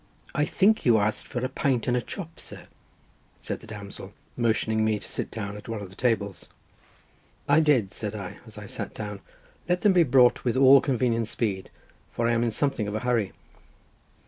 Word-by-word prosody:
"I 150 Hz, -, +1 dB
think 210 Hz, +6 st, +3 dB
you 120 Hz, -3 st, +5 dB
asked 105 Hz, 0 st, 0 dB
for 125 Hz, 0 st, -3 dB
a -, -, +1 dB
pint 130 Hz, -3 st, -1 dB
and 125 Hz, -, +2 dB
a 125 Hz, -, +1 dB
chop, 165 Hz, +4 st, -8 dB
sir?" -, -, -10 dB, 0.8 s
said -, -, -5 dB
the -, -, -14 dB
damsel, 100 Hz, -2 st, -9 dB, 0.2 s
motioning 110 Hz, -2 st, +1 dB
me 110 Hz, -1 st, +2 dB
to -, -, -10 dB
sit -, -, -3 dB
down 100 Hz, -2 st, -5 dB
at 105 Hz, +2 st, -10 dB
one 115 Hz, -2 st, -3 dB
of 100 Hz, -3 st, -8 dB
the -, -, -14 dB
tables. 105 Hz, -6 st, -1 dB, 1.0 s
"I 145 Hz, +2 st, +5 dB
did," 130 Hz, -11 st, +2 dB
said 105 Hz, -1 st, -3 dB
I, 100 Hz, -4 st, -7 dB
as -, -, -9 dB
I -, -, -8 dB
sat -, -, -4 dB
down, 105 Hz, -2 st, -5 dB, 0.5 s
"let 180 Hz, 0 st, +1 dB
them 205 Hz, -2 st, +5 dB
be 180 Hz, -, +5 dB
brought 125 Hz, -5 st, +4 dB
with 125 Hz, 0 st, 0 dB
all 135 Hz, +1 st, +8 dB
convenient 120 Hz, -4 st, 0 dB
speed, 100 Hz, -5 st, -2 dB, 0.4 s
for 115 Hz, -, -1 dB
I -, -, +2 dB
am 115 Hz, -, +1 dB
in 120 Hz, -, +1 dB
something 115 Hz, -2 st, 0 dB
of 105 Hz, -, -3 dB
a 110 Hz, -, -2 dB
hurry." 115 Hz, -6 st, 0 dB
115 Hz, 200 wpm, -26 LUFS, 105-130 Hz, 1.0 s, all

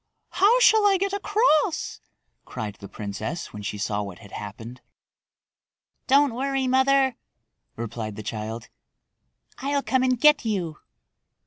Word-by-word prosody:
"How 420 Hz, +6 st, +4 dB
shall 440 Hz, -2 st, +6 dB
I 395 Hz, -1 st, +4 dB
get 395 Hz, +1 st, -1 dB
across?" 400 Hz, -6 st, +1 dB, 0.4 s
cried 105 Hz, -2 st, -6 dB
the 100 Hz, -, -9 dB
princess 110 Hz, -, -5 dB
when 105 Hz, -, -7 dB
she 105 Hz, 0 st, -4 dB
saw 105 Hz, 0 st, -2 dB
what 100 Hz, -3 st, -7 dB
had 100 Hz, -4 st, -15 dB
happened. 115 Hz, +4 st, -8 dB, 1.3 s
"Don't 275 Hz, -1 st, +4 dB
worry, 270 Hz, +1 st, -1 dB
mother," 265 Hz, 0 st, +3 dB, 0.6 s
replied 115 Hz, -2 st, -5 dB
the 110 Hz, -, -7 dB
child. 110 Hz, +2 st, -5 dB, 0.9 s
"I'll 280 Hz, +1 st, -1 dB
come 260 Hz, -1 st, +1 dB
and 255 Hz, -2 st, +1 dB
get 300 Hz, +1 st, +5 dB
you." 185 Hz, -8 st, -2 dB
235 Hz, 130 wpm, -25 LUFS, -, 1.3 s, shall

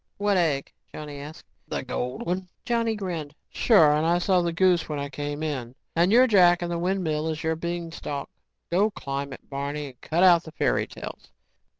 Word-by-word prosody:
"What 205 Hz, 0 st, +1 dB
egg?" 155 Hz, -6 st, 0 dB, 0.2 s
Johnny 150 Hz, -2 st, -7 dB
asked. 150 Hz, +3 st, -10 dB, 0.2 s
"The -, -, -3 dB
gold 125 Hz, 0 st, -4 dB
one." 180 Hz, +1 st, -2 dB, 0.2 s
Johnny 230 Hz, -2 st, +1 dB
grinned. 170 Hz, -7 st, -5 dB, 0.2 s
"Sure, 180 Hz, -11 st, +5 dB
and 150 Hz, +1 st, +1 dB
I 170 Hz, +2 st, +3 dB
saw 180 Hz, 0 st, +2 dB
the 170 Hz, -1 st, 0 dB
goose 175 Hz, -1 st, +2 dB
when 150 Hz, -, -2 dB
I 140 Hz, 0 st, -3 dB
came 145 Hz, +1 st, -4 dB
in. 130 Hz, -6 st, -4 dB, 0.2 s
And 170 Hz, +3 st, +3 dB
you're 245 Hz, +3 st, +7 dB
Jack 180 Hz, -6 st, +5 dB
and 175 Hz, -, -3 dB
the 170 Hz, -, -1 dB
windmill 170 Hz, -4 st, -1 dB
is 155 Hz, 0 st, -4 dB
your 160 Hz, 0 st, +1 dB
beanstalk. 165 Hz, -3 st, -5 dB, 0.4 s
Go 195 Hz, +5 st, +3 dB
climb 140 Hz, -7 st, -5 dB
it, -, -, -11 dB
Barney 140 Hz, +2 st, -4 dB
and 125 Hz, -, -18 dB
cut 170 Hz, +3 st, +1 dB
out 175 Hz, -2 st, +7 dB
the 160 Hz, -, -11 dB
fairy -, -, +1 dB
tales." -, -, -9 dB
165 Hz, 195 wpm, -26 LUFS, 145-180 Hz, 0.4 s, you're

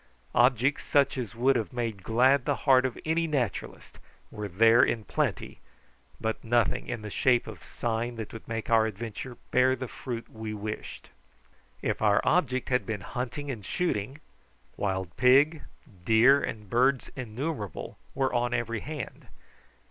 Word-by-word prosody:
Objects 125 Hz, +3 st, +3 dB
such 140 Hz, -1 st, +2 dB
as 120 Hz, -4 st, -5 dB
would 130 Hz, +3 st, +3 dB
have 115 Hz, -3 st, -1 dB
made 115 Hz, -5 st, -3 dB
glad 125 Hz, +5 st, +3 dB
the 145 Hz, -, +1 dB
heart 130 Hz, -2 st, +5 dB
of 125 Hz, -, -8 dB
any 165 Hz, +1 st, +1 dB
naturalist 130 Hz, -9 st, -3 dB, 0.3 s
were 105 Hz, -1 st, -5 dB
there 115 Hz, +5 st, +5 dB
in 110 Hz, -, +1 dB
plenty, -, -, -2 dB, 0.6 s
but 110 Hz, 0 st, -3 dB
nothing 120 Hz, -1 st, +1 dB
in 115 Hz, -3 st, -4 dB
the 105 Hz, -, -6 dB
shape 125 Hz, +2 st, +2 dB
of 105 Hz, -6 st, -9 dB
sign 120 Hz, +1 st, -3 dB
that 110 Hz, -2 st, -7 dB
would 115 Hz, -, -10 dB
make 115 Hz, -1 st, -4 dB
our 110 Hz, -1 st, +4 dB
adventure 115 Hz, +3 st, -6 dB
bear 130 Hz, +1 st, +4 dB
the 130 Hz, 0 st, -5 dB
fruit 115 Hz, -2 st, -6 dB
we 110 Hz, -1 st, -6 dB
wished. 105 Hz, +1 st, -7 dB, 0.7 s
If -, -, -1 dB
our 105 Hz, -2 st, +4 dB
object 130 Hz, -7 st, +1 dB
had 125 Hz, -1 st, +2 dB
been 110 Hz, -4 st, -4 dB
hunting 130 Hz, +6 st, -4 dB
and 110 Hz, -6 st, -7 dB
shooting, 135 Hz, -, -2 dB, 0.6 s
wild 95 Hz, -3 st, -2 dB
pig, 140 Hz, +5 st, +5 dB, 0.4 s
deer, 115 Hz, +7 st, +5 dB
and 105 Hz, -2 st, -5 dB
birds 130 Hz, +5 st, +2 dB
innumerable 130 Hz, -, -5 dB, 0.2 s
were 135 Hz, -1 st, 0 dB
on 120 Hz, 0 st, +1 dB
every 115 Hz, -1 st, -2 dB
hand. 150 Hz, -1 st, -7 dB
120 Hz, 155 wpm, -28 LUFS, 110-130 Hz, 0.7 s, heart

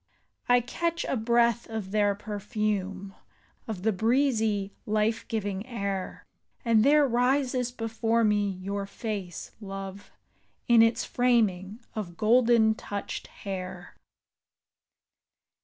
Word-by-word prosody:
I 245 Hz, 0 st, +6 dB
catch 335 Hz, +7 st, -2 dB
a -, -, -1 dB
breath 235 Hz, 0 st, +2 dB
of 220 Hz, -4 st, -5 dB
their 205 Hz, -1 st, +2 dB
perfume. 205 Hz, -2 st, -3 dB, 0.5 s
Of 205 Hz, -5 st, -5 dB
the 220 Hz, -, +3 dB
breezy, 220 Hz, -2 st, +1 dB
life 215 Hz, +1 st, 0 dB
giving 205 Hz, -3 st, -2 dB
air. 200 Hz, -6 st, -4 dB, 0.4 s
And 225 Hz, -2 st, +4 dB
there 290 Hz, +1 st, +5 dB
rises 250 Hz, 0 st, +1 dB
before 225 Hz, 0 st, 0 dB
me 205 Hz, -1 st, +2 dB
your 195 Hz, +1 st, -4 dB
face, 200 Hz, -5 st, -5 dB
love, 195 Hz, 0 st, -7 dB, 0.6 s
In 235 Hz, -1 st, +7 dB
its 230 Hz, +1 st, +3 dB
framing 220 Hz, -4 st, +1 dB
of 190 Hz, -7 st, -5 dB
golden 230 Hz, -1 st, +4 dB
touched 205 Hz, -2 st, -6 dB
hair. 185 Hz, -2 st, -7 dB
215 Hz, 105 wpm, -28 LUFS, 200-235 Hz, 0.6 s, In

